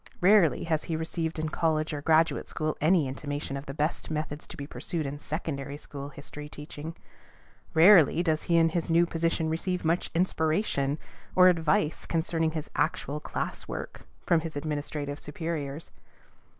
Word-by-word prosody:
Rarely 185 -4 +5
has 160 -2 0
he 165 - -2
received 160 0 -2
in 155 0 -1
college 155 0 0
or 145 - -3
graduate 160 +2 +3
school 155 -1 -2
any 160 -1 +4
intimation 145 +1 -4
of 140 +1 -6
the - - -4
best 150 +2 -1
methods 155 -1 -4
to - - -10
be 140 - -5
pursued 160 +2 -3
in 140 +1 -4
secondary 145 -3 -4
school 140 -1 -8
history 150 +1 -9
teaching. 150 +2 -8 0.8
Rarely 170 -1 +7
does 155 -3 +1
he 170 - +5
in 165 0 +5
his 165 0 -2
new 170 +1 +5
position 165 -1 0
receive 175 +2 -1
much 165 +2 +1
inspiration 160 -4 +1 0.4
or 185 0 +8
advice 160 -3 +1
concerning 165 -1 0
his 155 -1 -4
actual 145 +2 0
class - - -4
work - - -7 0.2
from 170 - +4
his 160 -1 -6
administrative 145 -1 -3
superiors. 150 -1 -4
155 Hz, 160 wpm, -28 LUFS, 150-165 Hz, 0.8 s, or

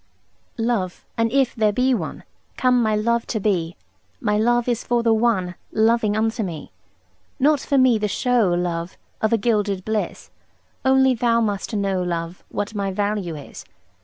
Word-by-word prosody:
Love, 225 -6 -2
an 230 0 +1
if 265 0 +2
there 215 -2 +2
be 255 +5 +2
one, 240 - -4 0.3
Come 250 -1 +3
my 215 -2 +2
love 235 +2 0
to 220 - -2
be, 180 -5 0 0.4
My 210 -2 0
love 240 +3 +2
is 240 -1 0
for 240 -1 0
the 230 -1 +4
one 215 -6 +1 0.2
Loving 220 -1 +2
unto 225 +1 0
me. 170 -7 -5 0.7
Not 290 +2 +3
for 280 - 0
me 255 -4 +4
the 210 - 0
show, 240 0 +2
love, 175 0 -2 0.2
Of 220 - +1
a 230 - +4
gilded 205 -4 0
bliss; 220 -1 -3 0.5
Only 265 0 +4
thou 235 -1 +2
must 210 0 -2
know, 195 -2 0
love, 170 0 -4
What 205 +1 -3
my 200 -2 -2
value 200 -3 -2
is. 145 -2 -10
220 Hz, 165 wpm, -22 LUFS, 195-240 Hz, 0.7 s, the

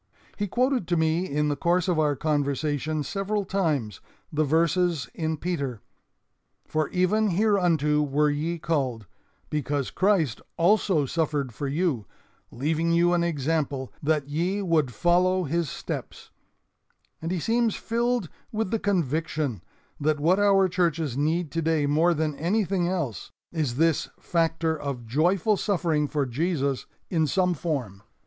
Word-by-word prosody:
He 205 - -2
quoted 250 -2 +1
to 175 - +1
me 160 +3 +1
in 150 +1 0
the 145 - 0
course 175 +5 +1
of 175 -3 +1
our 150 -2 +2
conversation 150 +1 -1
several 200 +5 -2
times 150 - -1 0.3
the 155 +1 +2
verses 165 +1 +1
in 160 -1 -2
Peter: 140 -9 -3 0.9
'For 155 -1 -1
even 200 +4 +2
hereunto 175 -7 +2
were 150 +1 +2
ye 160 +4 -2
called, 135 -9 -1 0.5
because 145 -2 -1
Christ 185 - +1 0.2
also 175 -3 +3
suffered 145 -4 -1
for 140 +6 -4
you, 140 - -1 0.4
leaving 160 +5 0
you 170 +1 +4
an 170 -1 +2
example, 145 -4 -1
that 150 -2 +1
ye 175 +7 -1
would 160 -7 +2
follow 180 +5 +2
His 170 0 -1
steps'; - - -6 0.9
and 165 - -3
he 185 - -1
seems 230 +4 +1
filled 235 -3 0 0.2
with 220 -3 -2
the 225 - +1
conviction 155 - -1 0.4
that 150 0 +1
what 175 +6 +3
our 195 -2 +5
churches 165 -7 0
need 155 +2 0
today 160 -2 +1
more 160 +4 +3
than 155 0 0
anything 185 +1 +1
else 160 - -3 0.2
is 150 -8 -1
this 165 +2 +2
factor 165 -1 0
of 140 -5 -5
joyful 175 - +2
suffering 165 -8 0
for 145 -1 -1
Jesus 140 0 -1 0.2
in 160 -3 +2
some 180 +3 +2
form. 135 - -3
160 Hz, 140 wpm, -26 LUFS, 145-180 Hz, 0.9 s, our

